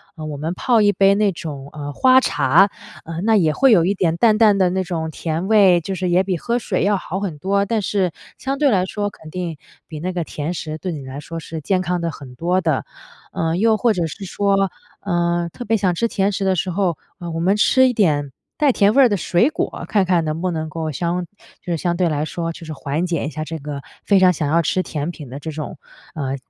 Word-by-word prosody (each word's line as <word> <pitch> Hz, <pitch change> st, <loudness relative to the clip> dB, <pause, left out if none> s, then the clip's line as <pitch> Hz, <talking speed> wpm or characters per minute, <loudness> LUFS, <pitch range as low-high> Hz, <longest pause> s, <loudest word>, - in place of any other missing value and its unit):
呃， 155 Hz, -2 st, -7 dB
我 150 Hz, -2 st, -5 dB
们 160 Hz, +4 st, -3 dB
泡 230 Hz, +3 st, +2 dB
一 205 Hz, -, +5 dB
杯 195 Hz, -1 st, +4 dB
那 205 Hz, -1 st, +2 dB
种， 145 Hz, -6 st, -7 dB
呃， 145 Hz, -1 st, -6 dB
花 260 Hz, -, +5 dB
茶， 155 Hz, -, +3 dB, 0.4 s
呃， 165 Hz, +1 st, -5 dB
那 220 Hz, +3 st, +3 dB
也 165 Hz, -7 st, +3 dB
会 270 Hz, -, +4 dB
有 175 Hz, -7 st, +5 dB
一 195 Hz, -, +2 dB
点 175 Hz, -4 st, 0 dB
淡 215 Hz, 0 st, +4 dB
淡 215 Hz, -3 st, +5 dB
的 185 Hz, -2 st, +3 dB
那 190 Hz, +1 st, -1 dB
种 165 Hz, -3 st, -3 dB
甜 165 Hz, +4 st, -3 dB
味， 195 Hz, -5 st, +5 dB
就 190 Hz, +4 st, -4 dB
是 185 Hz, -1 st, -2 dB
也 180 Hz, +2 st, +3 dB
比 185 Hz, -2 st, -1 dB
喝 235 Hz, +7 st, -1 dB
水 205 Hz, -5 st, -1 dB
要 200 Hz, +1 st, +2 dB
好 190 Hz, 0 st, -4 dB
很 185 Hz, -7 st, -4 dB
多， 200 Hz, +4 st, +1 dB
但 220 Hz, +1 st, 0 dB
是 190 Hz, -3 st, 0 dB, 0.3 s
相 270 Hz, +1 st, -3 dB
对 290 Hz, 0 st, +3 dB
来 185 Hz, -3 st, +2 dB
说 205 Hz, +2 st, -3 dB
肯 160 Hz, -5 st, -14 dB
定 170 Hz, -2 st, -4 dB, 0.3 s
比 155 Hz, -2 st, -7 dB
那 185 Hz, +3 st, -3 dB
个 175 Hz, -1 st, -1 dB
甜 155 Hz, +1 st, -4 dB
食 155 Hz, -2 st, -5 dB
对 180 Hz, +3 st, -4 dB
你 155 Hz, -4 st, -5 dB
来 130 Hz, +2 st, -7 dB
说 165 Hz, +2 st, -7 dB
是 160 Hz, 0 st, -7 dB
健 185 Hz, +4 st, +1 dB
康 180 Hz, -1 st, -1 dB
得 170 Hz, -, -1 dB
很 135 Hz, -4 st, -11 dB
多 180 Hz, +6 st, 0 dB
的。 160 Hz, -5 st, 0 dB, 0.5 s
呃， 165 Hz, 0 st, -1 dB
又 220 Hz, +2 st, +3 dB
或 230 Hz, -1 st, +2 dB
者 175 Hz, -3 st, -1 dB
是 195 Hz, +5 st, -8 dB
说， 195 Hz, 0 st, +1 dB, 0.3 s
呃， 175 Hz, -2 st, 0 dB
特 245 Hz, -, -7 dB
别 225 Hz, +1 st, +2 dB
想 185 Hz, -4 st, +1 dB
吃 230 Hz, -, +1 dB
甜 200 Hz, -2 st, 0 dB
食 195 Hz, -, -2 dB
的 190 Hz, -1 st, +2 dB
时 185 Hz, +2 st, -1 dB
候， 180 Hz, -2 st, 0 dB, 0.2 s
呃， 175 Hz, -, -6 dB
我 165 Hz, -, -3 dB
们 190 Hz, +5 st, +2 dB
吃 260 Hz, +5 st, +4 dB
一 250 Hz, -, 0 dB
点 145 Hz, -10 st, +1 dB, 0.3 s
带 295 Hz, -2 st, +4 dB
甜 205 Hz, -1 st, +3 dB
味 275 Hz, -, +6 dB
儿 -, -, +7 dB
的 205 Hz, -, +1 dB
水 185 Hz, -, +2 dB
果， -, -, -4 dB
看 205 Hz, -3 st, +2 dB
看 175 Hz, -3 st, +2 dB
能 155 Hz, +1 st, -3 dB
不 185 Hz, -, 0 dB
能 160 Hz, -1 st, -3 dB
够 160 Hz, 0 st, -4 dB
相 175 Hz, +4 st, -2 dB, 0.4 s
就 180 Hz, -, -4 dB
是 -, -, -1 dB
相 175 Hz, +2 st, -1 dB
对 175 Hz, -1 st, +1 dB
来 150 Hz, -1 st, -1 dB
说 165 Hz, +1 st, -3 dB
就 165 Hz, -, -10 dB
是 155 Hz, -, -6 dB
缓 145 Hz, +4 st, -2 dB
解 165 Hz, -5 st, -1 dB
一 -, -, -2 dB
下 155 Hz, 0 st, -5 dB
这 165 Hz, +1 st, -5 dB
个 145 Hz, -1 st, -6 dB, 0.2 s
非 200 Hz, -2 st, +4 dB
常 185 Hz, -1 st, +5 dB
想 150 Hz, -3 st, -2 dB
要 165 Hz, +2 st, +3 dB
吃 185 Hz, +4 st, 0 dB
甜 150 Hz, -1 st, -4 dB
品 150 Hz, -6 st, -10 dB
的 135 Hz, +3 st, -7 dB
这 160 Hz, +2 st, -6 dB
种， 155 Hz, -1 st, -6 dB, 0.4 s
呃， 135 Hz, -3 st, -2 dB
175 Hz, 270 characters per minute, -20 LUFS, 160-200 Hz, 0.5 s, 儿